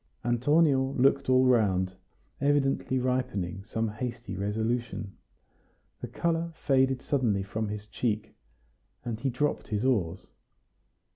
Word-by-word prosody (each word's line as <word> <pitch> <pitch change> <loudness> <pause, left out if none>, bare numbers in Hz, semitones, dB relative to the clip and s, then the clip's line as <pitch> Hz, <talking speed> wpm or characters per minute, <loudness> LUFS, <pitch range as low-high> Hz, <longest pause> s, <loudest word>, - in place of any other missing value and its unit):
Antonio 135 +2 +3
looked 135 +1 +3
all 130 0 +5
round, 95 -7 +3 0.5
evidently 140 -2 +2
ripening 125 -8 -1
some 110 +2 -2
hasty 115 -1 -5
resolution. 110 +1 -2 0.9
The - - -4
color 170 0 -1
faded 130 -3 +2
suddenly 115 -9 +1
from 110 +2 -3
his 105 0 -5
cheek, 110 -1 -2 0.7
and 115 -2 -3
he 135 +3 0
dropped 145 +4 -1
his 105 +2 -1
oars. 95 -8 0
120 Hz, 115 wpm, -28 LUFS, 105-130 Hz, 0.9 s, all